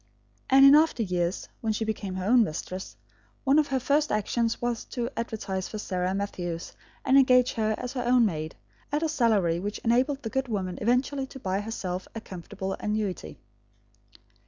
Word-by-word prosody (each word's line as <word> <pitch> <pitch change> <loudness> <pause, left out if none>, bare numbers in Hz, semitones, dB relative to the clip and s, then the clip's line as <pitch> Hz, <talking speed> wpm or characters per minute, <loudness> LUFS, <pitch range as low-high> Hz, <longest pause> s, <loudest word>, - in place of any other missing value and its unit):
And 270 0 +7
in 275 - +9
after 305 -5 +4
years, 180 -2 -1
when 220 -1 -1
she 220 +1 -2
became 200 -3 -3
her 185 0 -3
own 240 +3 +5
mistress, 185 +1 -5 0.5
one 280 +2 +4
of 300 - +2
her 265 -1 0
first 290 +4 +1
actions 225 +2 0
was 240 -1 -2
to 240 -1 -4
advertise 200 -5 -3
for 215 - -6
Sarah 185 -2 -2
Matthews 175 -4 -4 0.3
and 270 +1 +6
engage 250 -2 +4
her 220 -1 0
as 250 +1 -5
her 250 -2 -2
own 245 -1 +4
maid, 155 -5 -3 0.4
at 295 +2 0
a - - +2
salary 215 - +2
which 205 +3 -4
enabled 260 +4 +1
the 225 - -4
good 265 0 -1
woman 190 -5 -3
eventually 260 +4 +1
to 265 - -11
buy 190 -4 -1
herself 190 -4 -4
a - - -3
comfortable 190 0 -6
annuity. 205 - -3
220 Hz, 180 wpm, -27 LUFS, 190-255 Hz, 0.5 s, in